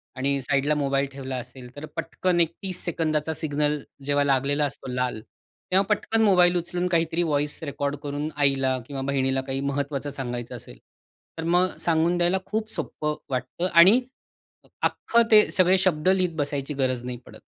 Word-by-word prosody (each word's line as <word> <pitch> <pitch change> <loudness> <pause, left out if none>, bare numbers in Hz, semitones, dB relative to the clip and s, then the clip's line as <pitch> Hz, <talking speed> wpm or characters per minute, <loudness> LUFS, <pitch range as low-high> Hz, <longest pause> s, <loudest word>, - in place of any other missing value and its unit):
आणि 140 +1 0
साइडला 140 +3 +1
मोबाईल 140 -1 +1
ठेवला 135 -1 -6
असेल, 125 0 -9
तर 145 +2 -7
पटकन 175 +1 -1
एक 165 0 +1
30 185 -2 -2
सेकंदांचा 160 -2 -1
सिग्नल 150 -1 -1 0.3
जेव्हा 145 0 +2
लागलेला 140 +1 +1
असतो 140 - -6
लाल, 125 -3 -1
तेव्हा 185 - -3
पटकन 225 +2 -1
मोबाईल 180 -4 +5
उचलून 175 +1 -2
काहीतरी 170 -1 +1
व्हॉइस 150 -2 -1
रेकॉर्ड 140 -1 -2
करून 145 +1 -3
आईला 135 -2 +2
किंवा 140 -2 -5
बहिणीला 135 -1 +1
काही 135 0 -4
महत्त्वाचं 140 0 -2
सांगायचं 125 -3 -5
असेल, 85 - -11 0.6
तर 160 - -4
मग 180 +2 +2
सांगून 165 +1 +1
द्यायला 175 +2 +2
खूप 220 0 -3
सोपं 150 0 -3
वाटतं 130 +7 -2
आणि 185 +8 +8 0.8
अख्खं 235 - +2
ते 210 -1 +7
सगळे 185 0 +4
शब्द 185 -3 +2
लिहित 185 -3 +2
बसायची 145 -1 -2
गरज 130 -3 -1
नाही 125 0 -5
पडत. - - -13
145 Hz, 160 wpm, -25 LUFS, 135-175 Hz, 0.8 s, आणि